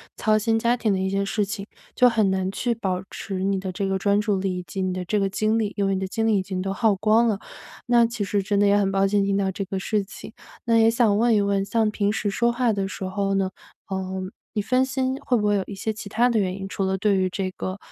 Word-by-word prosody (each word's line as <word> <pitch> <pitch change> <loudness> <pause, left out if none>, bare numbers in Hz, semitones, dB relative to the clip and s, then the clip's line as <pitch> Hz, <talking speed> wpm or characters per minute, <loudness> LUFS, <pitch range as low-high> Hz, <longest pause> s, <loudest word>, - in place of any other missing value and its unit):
操 215 -1 +2
心 225 +1 +1
家 235 +2 +2
庭 220 -4 +1
的 - - 0
一 190 0 -1
些 195 0 0
事 210 +1 0
情， 200 0 -5 0.3
就 250 - +5
很 215 -4 +2
难 190 0 0
去 235 +5 -1
保 190 -5 -2
持 195 -3 -5
你 195 -1 +1
的 185 -1 -5
这 195 - -2
个 190 0 0
专 200 +1 +2
注 205 -2 0
力 185 -1 -2
以 - - -6
及 195 - -5
你 185 -1 -1
的 185 0 -3
这 210 +4 0
个 195 - +1
精 215 +3 +1
力， 210 -2 -1
因 200 - 0
为 195 - +1
你 190 - -1
的 190 - -2
精 225 +4 -1
力 220 -2 +3
已 - - +1
经 185 -1 -4
都 195 +1 -2
耗 215 0 +2
光 215 +4 +3
了。 210 -3 +1 0.5
那 240 -1 +5
其 230 -2 -3
实 200 0 0
真 200 +1 -1
的 205 - +4
也 200 0 +4
很 200 -1 +2
抱 195 0 +2
歉 200 +1 +2
听 200 0 +1
到 195 -1 +1
这 195 +1 -4
个 190 +1 -4
事 210 +2 0
情。 205 - -10 0.3
那 230 -1 +3
也 225 0 +6
想 230 -3 +3
问 230 +1 +3
一 205 - +3
问 200 -1 +1
像 220 0 +1
平 205 -1 0
时 210 -1 -1
说 235 +4 +1
话 240 -1 +1
的 195 -2 -1
时 195 - -7
候 195 +1 -1
呢， 195 -1 +1 0.4
呃， 190 -1 -3 0.4
你 210 - 0
分 255 +5 +2
心 260 0 -1
会 250 - +2
不 210 -3 +1
会 205 0 +3
有 195 - 0
一 200 - -7
些 220 +3 -2
其 215 -1 -8
他 235 +5 +2
的 230 -2 +2
原 185 -2 -1
因。 195 0 -6
除 195 - -2
了 190 0 0
对 200 0 +2
于 185 0 +1
这 190 +1 -2
个， 185 +1 -5
200 Hz, 310 characters per minute, -24 LUFS, 195-220 Hz, 0.5 s, 也